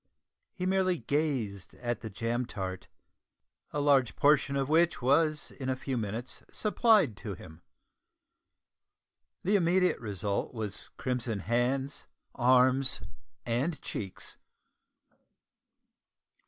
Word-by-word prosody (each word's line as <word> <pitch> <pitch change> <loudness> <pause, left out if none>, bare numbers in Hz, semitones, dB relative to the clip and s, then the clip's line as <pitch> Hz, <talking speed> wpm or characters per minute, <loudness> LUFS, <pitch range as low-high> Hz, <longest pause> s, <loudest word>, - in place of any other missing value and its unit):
He 180 - -4
merely 185 -1 +2
gazed 120 - -2
at 120 -1 -3
the 110 - -5
jam 115 +4 -2
tart, 95 -2 -5 0.8
a 150 - -2
large 140 -4 +3
portion 145 -1 +3
of 135 -1 0
which 165 +3 +3
was 150 +4 +2
in 130 -2 -5
a 130 - +1
few 130 0 -4
minutes 115 +2 -4
supplied 210 - +3
to 105 -4 -6
him. 80 -1 -13 1.8
The 200 +3 +2
immediate 180 0 +3
result 100 +1 -2
was 105 -3 -4
crimson 120 -5 -2
hands, 125 +6 -1 0.3
arms, 130 +1 +3 0.4
and 130 +8 -1
cheeks. 95 -3 -6
130 Hz, 105 wpm, -30 LUFS, 110-150 Hz, 1.8 s, large